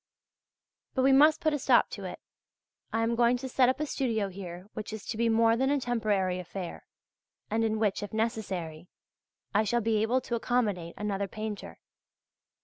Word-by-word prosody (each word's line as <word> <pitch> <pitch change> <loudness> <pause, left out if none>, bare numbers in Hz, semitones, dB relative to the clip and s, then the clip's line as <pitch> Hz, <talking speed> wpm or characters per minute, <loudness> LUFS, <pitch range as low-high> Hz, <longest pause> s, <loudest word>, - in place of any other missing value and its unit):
But 260 - +2
we 270 - +5
must 300 +3 +6
put 310 -1 +2
a 295 - 0
stop - - +4
to - - -6
it. - - -6 0.7
I 225 0 +1
am 230 +1 +1
going 240 +1 +3
to 265 +2 -5
set 255 -1 +3
up 260 - 0
a 305 - 0
studio 225 -8 -1
here 180 -1 -8
which 215 0 -6
is 220 - -7
to - - -4
be 230 +1 +1
more 225 0 +4
than 265 +3 +1
a 285 0 +2
temporary 210 -7 0
affair, 180 0 -7 0.6
and 225 +1 +1
in 220 -1 +1
which, 210 -3 0
if 205 -2 -5
necessary, 190 -8 -3 0.7
I 215 +1 +4
shall 240 +2 +1
be 225 0 +1
able 235 +4 +2
to 245 - -6
accommodate 215 -8 0
another 200 -1 -2
painter. 210 - -6
220 Hz, 185 wpm, -29 LUFS, 200-245 Hz, 0.7 s, must